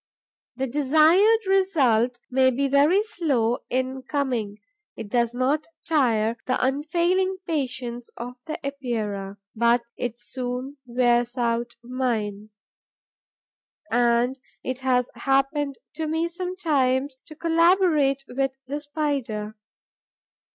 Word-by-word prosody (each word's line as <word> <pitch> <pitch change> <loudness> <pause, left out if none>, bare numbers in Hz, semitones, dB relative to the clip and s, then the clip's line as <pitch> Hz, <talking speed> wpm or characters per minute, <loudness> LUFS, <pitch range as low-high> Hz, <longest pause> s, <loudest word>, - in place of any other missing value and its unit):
The 265 +2 -1
desired 315 - +4
result 270 - +2
may 260 0 +4
be 275 +2 0
very 295 +9 +4
slow 275 - 0
in 260 +1 -1
coming. 250 -8 -2 0.4
It 205 - -7
does 235 +1 +1
not 275 +5 0 0.2
tire 235 -7 +2
the 255 - +2
unfailing 345 +8 +1
patience 250 -6 -3
of 245 +1 -6
the 310 - -3
Epeira, 215 -8 -3 0.2
but 235 +1 +3
it 240 -1 -4
soon 255 +3 -5
wears 240 0 +2
out 235 0 -1
mine. 225 -5 -2 1.4
And 240 +2 +2 0.2
it 255 0 -3
has 250 -2 +1
happened 275 +1 0 0.2
to 320 -1 -2
me 320 +2 0
sometimes 295 -7 0
to 310 - -11
collaborate 330 -4 +3
with 270 +1 -2
the 285 +3 -3
Spider. 280 -8 -3
260 Hz, 110 wpm, -24 LUFS, 240-305 Hz, 1.4 s, desired